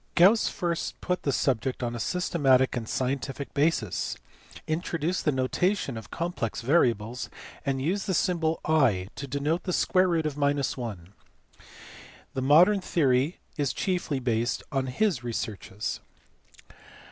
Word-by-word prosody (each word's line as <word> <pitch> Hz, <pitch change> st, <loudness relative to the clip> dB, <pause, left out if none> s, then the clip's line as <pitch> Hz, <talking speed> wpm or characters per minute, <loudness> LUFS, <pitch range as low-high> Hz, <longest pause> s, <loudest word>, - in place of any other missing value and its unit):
Gauss 195 Hz, +6 st, +6 dB
first 170 Hz, -3 st, -3 dB
put 180 Hz, 0 st, -1 dB
the 140 Hz, -, 0 dB
subject 130 Hz, -1 st, 0 dB
on 120 Hz, -1 st, -1 dB
a 120 Hz, -, -5 dB
systematic 135 Hz, -3 st, +2 dB
and 115 Hz, -3 st, -4 dB
scientific 135 Hz, +1 st, -2 dB
basis, 145 Hz, -, 0 dB, 0.5 s
introduced 170 Hz, +2 st, -2 dB
the 150 Hz, -, +4 dB
notation 140 Hz, -, 0 dB
of 110 Hz, -, -8 dB
complex 165 Hz, -11 st, -3 dB
variables, 120 Hz, -4 st, +1 dB, 0.4 s
and 135 Hz, -1 st, +1 dB
used 190 Hz, +7 st, -1 dB
the 190 Hz, -, +1 dB
symbol 165 Hz, -2 st, +1 dB
i 120 Hz, -12 st, +2 dB
to 140 Hz, -, -6 dB
denote 145 Hz, +5 st, -1 dB
the 185 Hz, -, -1 dB
square 185 Hz, +1 st, +3 dB
root 165 Hz, -3 st, +1 dB
of 150 Hz, -2 st, -2 dB
1: 125 Hz, -10 st, -1 dB, 1.2 s
the 130 Hz, -, -2 dB
modern 175 Hz, +9 st, +6 dB
theory 140 Hz, -2 st, +1 dB, 0.2 s
is 145 Hz, -3 st, 0 dB
chiefly 175 Hz, -7 st, -1 dB
based 120 Hz, -1 st, 0 dB
on 135 Hz, -2 st, 0 dB
his 140 Hz, -, 0 dB
researches. 110 Hz, -3 st, -4 dB
140 Hz, 135 wpm, -27 LUFS, 125-170 Hz, 1.2 s, Gauss